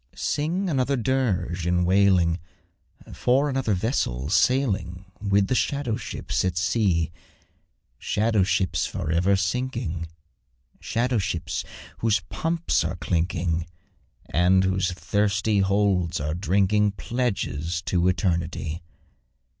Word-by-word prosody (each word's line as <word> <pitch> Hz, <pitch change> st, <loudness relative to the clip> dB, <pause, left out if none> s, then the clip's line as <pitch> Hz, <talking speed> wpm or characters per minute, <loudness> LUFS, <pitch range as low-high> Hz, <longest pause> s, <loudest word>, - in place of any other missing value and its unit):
Sing 170 Hz, +7 st, -1 dB
another 140 Hz, -3 st, +1 dB
dirge 100 Hz, -9 st, 0 dB
in 90 Hz, 0 st, +2 dB
wailing, 90 Hz, -3 st, +3 dB, 0.7 s
For 135 Hz, +4 st, +2 dB
another 130 Hz, -6 st, 0 dB
vessel 75 Hz, -, -1 dB
sailing 95 Hz, -8 st, +1 dB, 0.2 s
With 100 Hz, -1 st, +2 dB
the 130 Hz, -, -1 dB
shadow 140 Hz, -2 st, 0 dB
ships 115 Hz, -3 st, -3 dB
at 90 Hz, -2 st, -1 dB
sea; 95 Hz, -5 st, +1 dB, 0.9 s
Shadow 110 Hz, -1 st, +1 dB
ships 95 Hz, 0 st, +1 dB
for 75 Hz, -, -4 dB
ever 90 Hz, +4 st, +3 dB
sinking 95 Hz, -, -2 dB, 0.7 s
Shadow 120 Hz, 0 st, 0 dB
ships 85 Hz, -4 st, -2 dB, 0.4 s
whose 110 Hz, -2 st, +2 dB
pumps 165 Hz, +1 st, 0 dB
are -, -, -2 dB
clinking, 85 Hz, -1 st, -1 dB, 0.6 s
And 90 Hz, +3 st, +3 dB
whose 95 Hz, -1 st, +1 dB
thirsty 105 Hz, +3 st, 0 dB
holds 95 Hz, -3 st, +1 dB
are 75 Hz, +2 st, -2 dB
drinking 100 Hz, +3 st, +2 dB
Pledges 95 Hz, -, -2 dB
to 90 Hz, -1 st, +1 dB
Eternity. 85 Hz, -3 st, -1 dB
95 Hz, 105 wpm, -25 LUFS, 85-115 Hz, 0.9 s, wailing